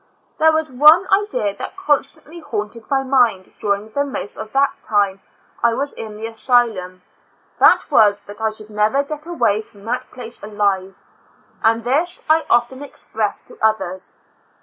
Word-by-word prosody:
There 320 Hz, 0 st, +6 dB
was 315 Hz, -2 st, -1 dB
one 305 Hz, +8 st, +6 dB
idea 390 Hz, -, +1 dB
that -, -, -7 dB
constantly 315 Hz, -1 st, -1 dB
haunted 220 Hz, -5 st, -5 dB
my 270 Hz, -1 st, +1 dB
mind 245 Hz, -8 st, +1 dB
during 205 Hz, +1 st, -1 dB
the 285 Hz, +6 st, -1 dB
most 270 Hz, -7 st, -5 dB
of 220 Hz, 0 st, -8 dB
the 275 Hz, +1 st, +4 dB
time 200 Hz, -2 st, +1 dB, 0.4 s
that 235 Hz, -, +4 dB
I 230 Hz, -, +1 dB
was 280 Hz, +3 st, -2 dB
in 215 Hz, -2 st, -8 dB
the 220 Hz, -, -6 dB
asylum: 225 Hz, -6 st, 0 dB, 0.6 s
that -, -, +5 dB
was, 205 Hz, -2 st, +4 dB
that 205 Hz, +2 st, -9 dB
I 220 Hz, -, +2 dB
should 215 Hz, 0 st, -7 dB
never 215 Hz, +7 st, +2 dB
get 300 Hz, +2 st, -6 dB
away 230 Hz, -11 st, +1 dB
from 205 Hz, -2 st, -17 dB
that 245 Hz, +2 st, -3 dB
place 240 Hz, -2 st, -8 dB
alive, 200 Hz, -2 st, -1 dB, 0.6 s
and 225 Hz, +1 st, +2 dB
this 295 Hz, +9 st, -1 dB
I 315 Hz, +1 st, +3 dB
often 240 Hz, +3 st, +2 dB
expressed 220 Hz, -6 st, -3 dB
to -, -, -15 dB
others. 190 Hz, -4 st, -1 dB
225 Hz, 165 wpm, -19 LUFS, 210-280 Hz, 0.6 s, There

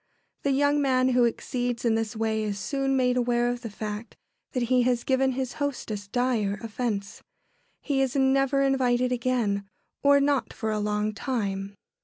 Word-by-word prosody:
The 280 Hz, -, 0 dB
young 285 Hz, +2 st, +3 dB
man 260 Hz, -2 st, +3 dB
who 250 Hz, -1 st, +4 dB
exceeds 245 Hz, +1 st, -2 dB
in 230 Hz, -, +3 dB
this 225 Hz, 0 st, -1 dB
way 220 Hz, 0 st, 0 dB
is 210 Hz, -2 st, -2 dB
soon 270 Hz, +4 st, -1 dB
made 250 Hz, -1 st, +2 dB
aware 240 Hz, -1 st, +2 dB
of 245 Hz, 0 st, -3 dB
the 230 Hz, -, -5 dB
fact 210 Hz, +2 st, -6 dB, 0.4 s
that 250 Hz, -3 st, 0 dB
he 250 Hz, +1 st, +3 dB
has 245 Hz, -1 st, +1 dB
given 265 Hz, 0 st, +2 dB
his 260 Hz, -1 st, -3 dB
hostess 220 Hz, -8 st, -3 dB
dire 225 Hz, -3 st, 0 dB
offence. 215 Hz, -3 st, -3 dB, 0.6 s
He 275 Hz, -2 st, +1 dB
is 265 Hz, -1 st, 0 dB
never 275 Hz, 0 st, +3 dB
invited 255 Hz, -2 st, +2 dB
again, 235 Hz, -5 st, 0 dB, 0.3 s
or 280 Hz, 0 st, +5 dB
not 280 Hz, -1 st, +1 dB
for 220 Hz, -2 st, -3 dB
a 215 Hz, -, -1 dB
long 210 Hz, 0 st, -1 dB
time. 200 Hz, -5 st, -3 dB
245 Hz, 170 wpm, -26 LUFS, 215-265 Hz, 0.6 s, or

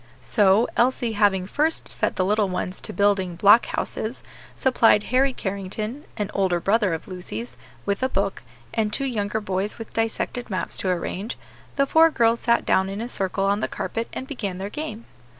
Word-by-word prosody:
So, 205 Hz, +1 st, +4 dB
Elsie 245 Hz, -1 st, +2 dB
having 205 Hz, -3 st, +2 dB
first 305 Hz, +10 st, 0 dB
set -, -, -1 dB
the 185 Hz, -, +1 dB
little 210 Hz, 0 st, +2 dB
ones 180 Hz, +1 st, -4 dB
to -, -, -5 dB
building 195 Hz, -3 st, +1 dB
block 205 Hz, +6 st, +6 dB
houses, 225 Hz, +4 st, -3 dB, 0.3 s
supplied 230 Hz, -5 st, +4 dB
Harry 270 Hz, +2 st, +4 dB
Carrington 210 Hz, +5 st, -4 dB
an 210 Hz, -2 st, -2 dB
older 185 Hz, -3 st, +1 dB
brother 205 Hz, +2 st, +2 dB
of 160 Hz, -, -9 dB
Lucy's 150 Hz, -, -6 dB, 0.3 s
with 200 Hz, +3 st, -1 dB
a 260 Hz, -, +1 dB
book, 195 Hz, -2 st, -1 dB, 0.3 s
and 215 Hz, -1 st, 0 dB
two 275 Hz, -, 0 dB
younger 220 Hz, -4 st, -1 dB
boys 195 Hz, 0 st, -2 dB
with 225 Hz, -, -9 dB
dissected 225 Hz, +2 st, -2 dB
maps 185 Hz, -4 st, -3 dB
to 190 Hz, -, -2 dB
arrange, 185 Hz, +5 st, -3 dB, 0.4 s
the 275 Hz, -, +3 dB
four 320 Hz, +4 st, +5 dB
girls 235 Hz, -5 st, +2 dB
sat 235 Hz, -1 st, +2 dB
down 190 Hz, 0 st, +2 dB
in 195 Hz, +1 st, -5 dB
a 230 Hz, -, -3 dB
circle 195 Hz, -4 st, -1 dB
on 200 Hz, +1 st, +2 dB
the -, -, -1 dB
carpet 230 Hz, 0 st, -4 dB
and 260 Hz, -, -5 dB
began 210 Hz, -10 st, -4 dB
their 195 Hz, +2 st, -5 dB
game. 235 Hz, -6 st, -6 dB
210 Hz, 185 wpm, -24 LUFS, 190-235 Hz, 0.4 s, block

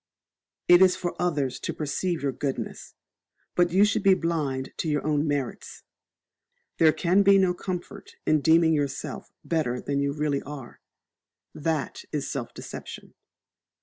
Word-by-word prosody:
It 175 Hz, +1 st, +7 dB
is 185 Hz, -1 st, +6 dB
for 175 Hz, -1 st, -3 dB
others 145 Hz, -7 st, 0 dB
to -, -, -4 dB
perceive 160 Hz, +2 st, -2 dB
your 140 Hz, -, +1 dB
goodness; 135 Hz, +1 st, -5 dB, 0.6 s
but 175 Hz, -1 st, +3 dB
you 190 Hz, +4 st, +5 dB
should 210 Hz, 0 st, +1 dB
be 195 Hz, -1 st, +5 dB
blind 150 Hz, -7 st, -2 dB
to 160 Hz, -, -2 dB
your 150 Hz, -1 st, -1 dB
own 150 Hz, 0 st, +1 dB
merits. 140 Hz, -4 st, -4 dB, 1.0 s
There 160 Hz, -1 st, +6 dB
can 180 Hz, +4 st, +2 dB
be 200 Hz, 0 st, +6 dB
no 185 Hz, -2 st, +3 dB
comfort 180 Hz, -1 st, -6 dB
in 155 Hz, -1 st, +3 dB
deeming 160 Hz, +1 st, +5 dB
yourself 145 Hz, -2 st, -3 dB
better 140 Hz, -7 st, 0 dB
than 140 Hz, +2 st, -2 dB
you 140 Hz, 0 st, 0 dB
really 145 Hz, -1 st, -1 dB
are: 140 Hz, -4 st, -10 dB, 0.7 s
that 155 Hz, -4 st, -2 dB
is 145 Hz, -2 st, -2 dB
self 130 Hz, -5 st, -4 dB
deception. -, -, -9 dB
155 Hz, 150 wpm, -26 LUFS, 140-175 Hz, 1.0 s, It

